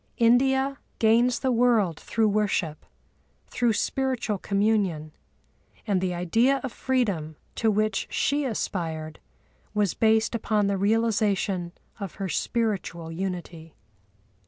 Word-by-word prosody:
India 265 +3 +3 0.2
gains 235 +2 +3
the 260 - +1
world 230 -9 +2
through 225 -1 0
worship, 200 -7 -1 0.6
through 240 -2 +1
spiritual 250 -3 -1
communion; 200 -7 0 0.7
and 200 -4 +1
the 185 -1 0
idea 225 +10 +2
of 265 - -3
freedom 200 -15 -1 0.2
to 225 - +1
which 215 -1 0
she 290 +1 0
aspired 160 - -3 0.6
was 205 -4 +2
based 220 0 +2
upon 215 -2 +1
the 200 0 +1
realisation 205 -4 +1 0.3
of 195 -5 -6
her 195 -2 -4
spiritual 190 -5 -2
unity. 170 -2 -6
210 Hz, 110 wpm, -26 LUFS, 180-235 Hz, 0.7 s, India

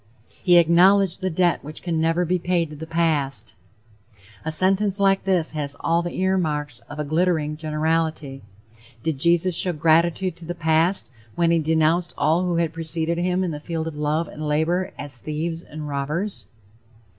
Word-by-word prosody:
"He 175 -2 +5
acknowledged 180 +3 +4
the 185 - 0
debt 175 0 +1
which 150 +2 -9
can 165 -3 -1
never 165 +2 +1
be 180 +2 0
paid 170 -2 -1
to - - -8
the 160 +2 -8
past." 145 -10 -1 0.9
A 160 - -2
sentence 195 +4 +3
like 195 -1 +2
this 180 -4 +1
has 145 -2 -3
all 165 +1 +1
the 175 0 -5
ear 190 0 +2
marks 150 -6 -3
of 145 - -8
a 150 - -2
glittering 155 -1 0
generality. 155 -2 -2 0.6
Did 160 -4 -2
Jesus 170 +3 +3
show 180 +1 +3
gratitude 170 +3 +2
to 170 - -11
the 175 +1 -5
past 165 +1 +1 0.2
when 170 -1 +2
he 170 - +3
denounced 160 +2 +1
all 160 +4 +2
who 175 -1 -1
had 165 -1 0
preceded 165 +1 -1
him 180 +1 0
in 180 - -2
the 150 - -5
field 160 +1 -4
of 160 -2 -6
love 150 +2 -1
and 155 - -10
labor 170 +5 0
as 140 -4 -6
"thieves 160 +4 -4
and 155 -2 -8
robbers?" 150 +8 -3
165 Hz, 180 wpm, -23 LUFS, 155-175 Hz, 0.9 s, He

